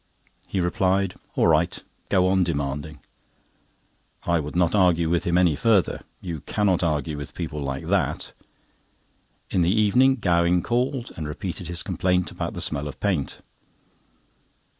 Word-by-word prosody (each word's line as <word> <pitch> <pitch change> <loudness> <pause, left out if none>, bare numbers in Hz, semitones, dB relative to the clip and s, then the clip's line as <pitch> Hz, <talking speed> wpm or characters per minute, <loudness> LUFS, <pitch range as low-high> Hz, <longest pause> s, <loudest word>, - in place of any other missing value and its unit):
He 95 - -2
replied: 95 +1 +1 0.2
"All - - +3
right, - - +3 0.3
go 90 - +3
on 95 0 +3
demanding." 75 -2 -3 1.2
I 85 -1 +1
would 75 +1 -5
not 90 -2 +2
argue 85 -5 +3
with 85 - +1
him 85 0 +2
any 90 -4 +4
further. 105 0 +2 0.2
You 85 -4 -5
cannot 95 +1 0
argue 75 -3 0
with 70 -1 -8
people 75 - -4
like 70 -1 -4
that. - - -1 1.2
In 90 - +2
the 85 - +3
evening 110 +6 +4
Gowing 85 -5 +2
called, 125 +1 -1
and 80 -3 -5
repeated 85 +2 -5
his 85 -1 -3
complaint 90 -1 0
about - - -4
the - - -4
smell 70 +1 -1
of 70 - -8
paint. 90 -9 -1
90 Hz, 145 wpm, -24 LUFS, 80-95 Hz, 1.2 s, any